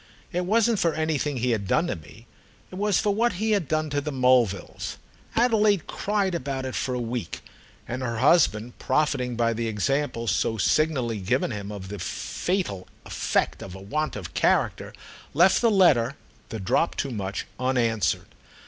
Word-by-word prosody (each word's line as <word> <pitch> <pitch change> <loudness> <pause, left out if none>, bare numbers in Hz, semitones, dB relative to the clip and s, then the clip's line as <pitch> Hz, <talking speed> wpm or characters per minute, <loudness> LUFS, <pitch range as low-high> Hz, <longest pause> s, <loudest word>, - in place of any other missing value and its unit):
It 180 +1 -2
wasn't 225 +1 +3
for 165 -2 +1
anything 155 -3 -1
he 125 +1 0
had 105 -4 -1
done 165 - +2
to - - -2
me; 80 +9 -14 0.5
it - - -8
was 205 -2 +2
for 205 -2 +1
what 230 +2 +2
he 215 +5 -1
had 200 -8 +1
done 155 0 -1
to 145 0 0
the 150 - -4
Mulvilles. 125 -7 +1 0.4
Adelaide 215 -6 +3
cried 200 -2 -1
about 135 -4 -3
it 130 - -4
for 125 - -2
a - - -2
week, 120 -5 -4 0.5
and 125 +2 -4
her 115 -3 -2
husband, 125 -5 +3
profiting 130 -3 0
by 115 0 +1
the 115 +1 -2
example 115 +3 -1
so 110 0 0
signally 125 -1 +1
given 120 +8 0
him 100 -2 -5
of 95 -2 -7
the 105 0 -6
fatal 175 - -3 0.2
effect - - -1
of 95 - -8
a - - -9
want 155 +11 -2
of 95 -6 -7
character, - - +1 0.4
left 175 +5 +5
the 235 - +4
letter, 140 - +4 0.3
the 110 - -5
drop 95 - +1
too 140 - -2
much, 100 -3 -4
unanswered. 120 - +1
130 Hz, 175 wpm, -25 LUFS, 115-170 Hz, 0.5 s, left